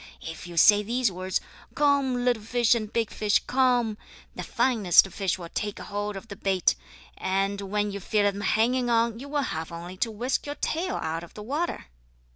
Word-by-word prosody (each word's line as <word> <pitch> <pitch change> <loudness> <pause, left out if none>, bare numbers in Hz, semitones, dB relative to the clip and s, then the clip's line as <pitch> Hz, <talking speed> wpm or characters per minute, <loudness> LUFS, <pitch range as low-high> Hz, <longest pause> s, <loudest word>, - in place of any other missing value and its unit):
If 165 +1 -8
you 170 -1 -9
say 205 +5 +7
these 235 +1 0
words: 185 +1 -2 0.4
'Come, 275 -4 +2
little 240 -3 +2
fish 240 +2 +2
and 215 -3 -2
big 230 -2 -1
fish. 210 -1 +2
Come!' 245 -4 +2 0.4
the - - -5
finest 210 -8 +4
fish 190 0 -1
will 170 -2 -8
take 205 +2 -3
hold 205 0 -4
of 200 +4 -10
the 200 - -8
bait, 190 - +2 0.5
and 195 +1 0
when 205 +1 -1
you 200 - -5
feel 210 +2 +1
them 200 0 0
hanging 240 +5 +2
on 230 -1 +2
you 280 +2 -8
will 290 -1 0
have 160 -8 -4
only 175 +2 -8
to 230 - 0
whisk 240 +7 -2
your 290 - -4
tail 355 +6 -2
out 160 +1 -3
of 170 - -13
the 210 - -8
water." 295 +9 -2
210 Hz, 195 wpm, -26 LUFS, 195-245 Hz, 0.5 s, say